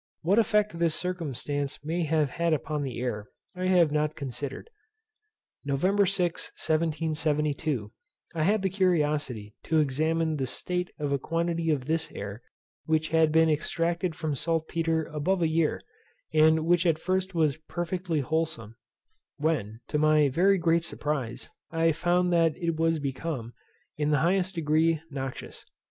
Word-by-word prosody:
What 195 +7 +4
effect 210 -5 +2
this 165 -2 +2
circumstance 145 -5 -3
may 165 +2 -1
have 155 -3 +1
had 170 -1 +1
upon 150 0 -2
the 130 -5 -4
air 110 -4 -3 0.3
I 185 0 -2
have 175 -5 +4
not 150 0 0
considered. 135 - -5 1.0
November 185 +9 +2
6, 180 -3 -1
1772, 155 -6 -1 0.4
I 165 - -2
had 200 +5 +2
the 190 - +1
curiosity 150 - 0
to 160 - +1
examine 155 +3 +1
the 135 -2 -1
state 180 +6 -2
of 145 -2 -2
a 140 - +1
quantity 165 +2 -1
of 140 -5 0
this 160 +2 -1
air 100 +3 -6 0.4
which 155 0 +1
had 160 -1 +3
been 160 +1 +5
extracted 165 +2 0
from 155 -2 -2
saltpetre 165 +1 0
above 170 +5 0
a - - +4
year, 160 -1 +1 0.5
and 160 +1 +4
which 175 +1 +3
at 165 -2 +3
first 185 +2 -1
was 155 -4 +2
perfectly 175 -2 -2
wholesome; 150 -7 -2 0.6
when, 125 -8 -1
to 150 - 0
my 155 -1 +4
very 190 +8 +3
great 165 -1 +2
surprize, 145 -7 -3 0.2
I 165 0 +2
found 175 +2 +1
that 165 -2 +3
it 170 -2 -1
was 165 0 +2
become, 135 -4 -4 0.4
in 150 0 0
the 145 -2 +2
highest 185 +1 +1
degree, 160 0 +2
noxious. 135 -2 -6
160 Hz, 150 wpm, -28 LUFS, 145-170 Hz, 1.0 s, been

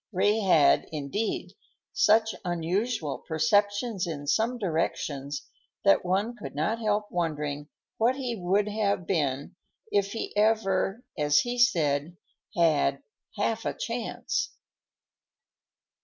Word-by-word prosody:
Ray 205 +3 +2
had, 165 -8 +4
indeed, 155 +9 -3 0.4
such 220 0 +4
unusual 175 - -1
perceptions 205 +5 +1
in 145 -3 -5
some 225 - +1
directions, 150 - -2 0.4
that 100 - +5
one 195 +6 0
could 215 - -8
not 210 +10 0
help 210 -1 0
wondering 150 -4 -2 0.3
what 235 +3 +3
he 255 -4 -3
would 195 +2 +1
have 205 -3 0
been 145 -1 -1 0.4
if 200 -1 +1
he 225 - -4
had 205 - +4 0.2
ever, 195 +2 -1 0.2
as 145 0 +4
he 245 0 -3
said, 160 - +2 0.4
had 145 -4 +2 0.3
"half 220 +2 0
a - - -2
chance." 230 0 -3
190 Hz, 115 wpm, -27 LUFS, 155-220 Hz, 0.4 s, that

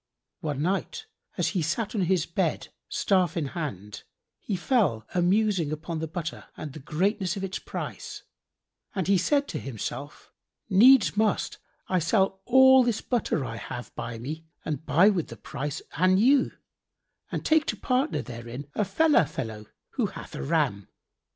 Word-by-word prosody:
One 145 -2 -2
night, 195 - -2 0.3
as - - +1
he 185 - -1
sat 170 +8 -1
on 210 - 0
his 175 -2 +2
bed, 170 -2 -1 0.2
staff 185 -3 +1
in 150 -4 -1
hand, 105 - -5 0.4
he 205 - -3
fell 180 - +1
a 180 - +2
musing 190 -3 +2
upon 160 +2 -4
the 160 - -3
butter 170 +1 -5
and 150 -3 -6
the 155 - -8
greatness 185 +6 -1
of 195 - -4
its 190 -1 -3
price - - -6 0.7
and 190 -3 0 0.2
said 285 +8 +1
in - - -3
himself, 135 +3 -6 0.4
"Needs 235 +4 +7
must 215 -1 0 0.3
I 185 - +2
sell 190 +2 +1
all 265 +1 +7
this 235 -3 0
butter 230 - -1
I 115 -2 -5
have 120 +2 -7
by 115 0 -5
me 155 +7 -6 0.2
and 150 -2 -3
buy 180 +7 +6
with 175 -6 -1
the - - -10
price 145 +1 -5
an 185 +2 +4
ewe 260 +5 +4 0.8
and - - -3
take 315 0 +3
to - - -1
partner 260 +4 0
therein 120 +4 -8
a - - -1
Fellah[FN#68] 210 - +3
fellow 110 -8 -5 0.3
who - - +2
hath - - -10
a - - -5
ram. 100 +8 0
175 Hz, 165 wpm, -27 LUFS, 145-210 Hz, 0.8 s, Needs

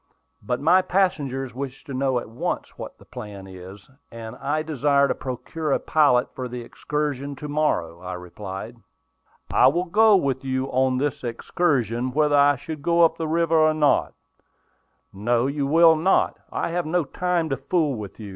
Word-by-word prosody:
"But 120 +4 -2
my 175 +6 +4
passengers 140 -10 -1
wish 135 +1 -6
to 140 - -8
know 130 -1 0
at 120 - -4
once 115 +2 -4
what - - -9
the - - -18
plan 100 -2 -9
is, 95 +1 -12 0.2
and 115 -1 -8
I 155 +2 -1
desire 140 -2 +2
to - - 0
procure 145 +4 -5
a - - +2
pilot 140 -6 +2
for 130 - -5
the 125 0 -6
excursion 145 +2 -3
to 150 +3 -7
morrow," 145 - -1
I 90 0 -6
replied. 95 +5 -8 0.8
"I - - +6
will 170 +7 +2
go 215 +4 +5
with 135 -7 0
you 130 0 -1
on 130 0 +2
the 145 +2 0
excursion, 125 - -1
whether 150 0 +2
I 145 0 +5 0.2
go 170 +2 +3
up 165 0 +3
the 160 - -2
river 165 0 +2
or 155 0 +4
not." 150 -2 +2 1.0
"No, 115 +5 0
you 140 0 -1
will 165 +2 +6
not. 170 +5 +2 0.2
I - - -2
have 170 -1 -2
no 175 +2 +1
time 175 +3 -1
to 135 - -1
fool 150 +2 0
with 105 -4 -8
you. 105 -2 -8
140 Hz, 175 wpm, -23 LUFS, 120-155 Hz, 1.0 s, I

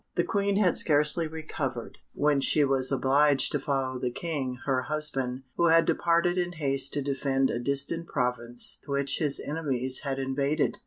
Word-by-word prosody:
The - - +2
Queen 200 -1 0
had 195 -4 +3
scarcely 150 +2 +2
recovered, 150 -6 -6 0.2
when 145 -1 +2
she 150 +2 +3
was 135 -1 +1
obliged 140 +1 +3
to 145 - 0
follow 135 -2 -2
the 125 - -1
King, 135 -2 -4
her 130 -2 +1
husband, 135 -3 -1
who 170 - +3
had 165 0 +5
departed 175 +1 +1
in 175 0 -2
haste 140 -4 0
to 145 - -1
defend 135 -1 0
a 120 - -2
distant 140 +6 0
province 120 -1 -2
which 140 -1 -1
his 145 -3 0
enemies 130 -4 -2
had 135 -2 -4
invaded. 140 +2 -1
140 Hz, 165 wpm, -27 LUFS, 130-155 Hz, 0.2 s, had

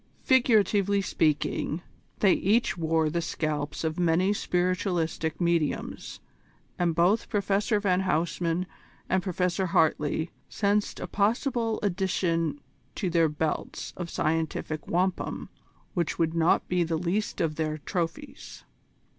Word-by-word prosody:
Figuratively 210 -6 +3
speaking, 160 -2 0 0.4
they 195 -3 +6
each 220 +6 +2
wore 160 -2 +1
the 170 +3 -1
scalps 150 -3 -3
of 160 +1 -2
many 180 +3 +3
spiritualistic 175 -4 -1
mediums, 170 -3 -1 0.6
and 170 -2 +1
both 180 +6 +2
Professor 205 +1 +1
van 185 -3 +2
Huysman 170 0 0 0.4
and 190 - +2
Professor 180 +1 0
Hartley 160 -1 +1 0.2
sensed 205 0 0
a - - -3
possible 225 +2 0
addition 185 - 0 0.4
to 185 -5 -2
their 165 -1 +3
belts 150 +1 -3
of 175 -2 -5
scientific 155 -1 -2
wampum 180 +2 -1 0.4
which 170 -4 -1
would 165 -1 +1
not 165 0 +2
be 180 -1 +2
the 165 -1 -1
least 180 +6 -1
of 160 -2 +1
their 155 0 -2
trophies. 175 - -5
175 Hz, 120 wpm, -27 LUFS, 160-200 Hz, 0.6 s, they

